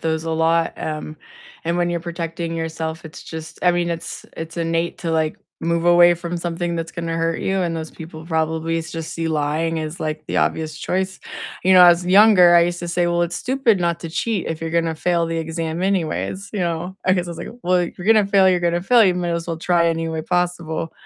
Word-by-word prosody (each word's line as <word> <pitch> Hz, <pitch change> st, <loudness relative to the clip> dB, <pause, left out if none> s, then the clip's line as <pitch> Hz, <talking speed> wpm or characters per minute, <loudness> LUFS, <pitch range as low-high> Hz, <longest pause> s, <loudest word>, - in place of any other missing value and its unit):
those 160 Hz, 0 st, -1 dB
a 165 Hz, -, -2 dB
lot, 165 Hz, +1 st, +2 dB
um, 155 Hz, 0 st, -5 dB, 0.5 s
and 170 Hz, +1 st, 0 dB
when 175 Hz, 0 st, +1 dB
you're 170 Hz, -, -2 dB
protecting 170 Hz, 0 st, -4 dB
yourself, 160 Hz, 0 st, -4 dB
it's 160 Hz, -, -10 dB
just 160 Hz, -1 st, -8 dB
I 180 Hz, -, +5 dB
mean, 175 Hz, 0 st, 0 dB
it's 165 Hz, -1 st, -6 dB
it's 165 Hz, +1 st, -7 dB
innate 165 Hz, 0 st, -1 dB
to, 165 Hz, -, -3 dB
like, 160 Hz, -1 st, 0 dB, 0.2 s
move 170 Hz, +1 st, 0 dB
away 175 Hz, 0 st, +6 dB
from 170 Hz, 0 st, -5 dB
something 170 Hz, 0 st, -3 dB
that's 165 Hz, -1 st, -4 dB
gonna 165 Hz, -1 st, -3 dB
hurt 165 Hz, 0 st, -1 dB
you, 190 Hz, 0 st, 0 dB
and 170 Hz, -2 st, -1 dB
those 160 Hz, -1 st, -5 dB
people 160 Hz, 0 st, -10 dB
probably 160 Hz, 0 st, -1 dB
just 160 Hz, 0 st, -6 dB
see 165 Hz, -1 st, -2 dB
lying 160 Hz, +2 st, 0 dB
as, 155 Hz, +1 st, -5 dB
like, 155 Hz, 0 st, -3 dB
the -, -, -3 dB
obvious 155 Hz, -1 st, -1 dB
choice. 190 Hz, +3 st, -2 dB, 0.4 s
You 190 Hz, -, +5 dB
know, 180 Hz, -1 st, +9 dB
as 175 Hz, 0 st, +5 dB
younger, 185 Hz, -3 st, +7 dB
I 170 Hz, -, +8 dB
used 175 Hz, 0 st, 0 dB
to 175 Hz, -, -5 dB
say, 175 Hz, 0 st, +1 dB
"Well, 175 Hz, 0 st, +1 dB
it's 175 Hz, 0 st, -2 dB
stupid 250 Hz, -6 st, +1 dB
not 170 Hz, -1 st, 0 dB
to 165 Hz, -, -6 dB
cheat 215 Hz, +2 st, -1 dB
if 160 Hz, -1 st, -4 dB
you're 165 Hz, 0 st, -3 dB
gonna 165 Hz, -1 st, 0 dB
fail 170 Hz, +1 st, 0 dB
the 165 Hz, -, -3 dB
exam 165 Hz, +1 st, -3 dB
anyways," 190 Hz, +1 st, -1 dB
you 205 Hz, -, -2 dB
know? 175 Hz, +2 st, -2 dB
I 185 Hz, -, +4 dB
guess 180 Hz, -2 st, 0 dB
I -, -, -6 dB
was 170 Hz, -, -8 dB
like, -, -, -6 dB, 0.2 s
"Well, 180 Hz, +1 st, +2 dB
if 175 Hz, 0 st, -3 dB
you're 180 Hz, -, -7 dB
gonna 220 Hz, -2 st, +5 dB
fail, 195 Hz, -2 st, +4 dB
you're 180 Hz, -1 st, +2 dB
gonna 175 Hz, 0 st, +1 dB
fail, 235 Hz, +3 st, +5 dB
you 185 Hz, -, +3 dB
might 175 Hz, -1 st, -2 dB
as 170 Hz, 0 st, -2 dB
well 165 Hz, -, -2 dB
try 170 Hz, 0 st, +2 dB
any 165 Hz, 0 st, -1 dB
way 160 Hz, -1 st, -3 dB
possible." 175 Hz, -2 st, -2 dB
170 Hz, 235 wpm, -21 LUFS, 160-175 Hz, 0.5 s, know